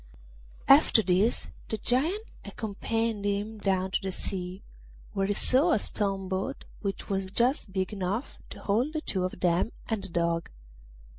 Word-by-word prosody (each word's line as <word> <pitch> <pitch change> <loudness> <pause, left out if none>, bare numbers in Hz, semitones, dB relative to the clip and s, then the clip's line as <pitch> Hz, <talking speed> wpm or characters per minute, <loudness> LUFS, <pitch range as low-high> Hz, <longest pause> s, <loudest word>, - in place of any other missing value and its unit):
After 275 -5 +7
this 195 +6 +2 0.2
the 220 - 0
Giant 300 - +1 0.2
accompanied 225 0 -2
him 205 +2 -1
down 190 -2 +1
to - - +1
the 190 - -2
sea, 185 0 -5 0.5
where 195 0 +1
he 205 - +1
saw 295 - +3
a - - +5
stone 195 -2 -1
boat 190 +9 -3 0.2
which 200 -2 -3
was 195 -1 -1
just 240 0 +1
big 190 +1 -1
enough 200 +5 -2
to - - -9
hold 240 +9 +1
the 310 - -1
two 190 -10 -1
of 185 - -5
them 175 +5 +2 0.2
and 220 -2 +1
the 195 - -6
Dog. 170 0 0
200 Hz, 160 wpm, -29 LUFS, 190-230 Hz, 0.5 s, After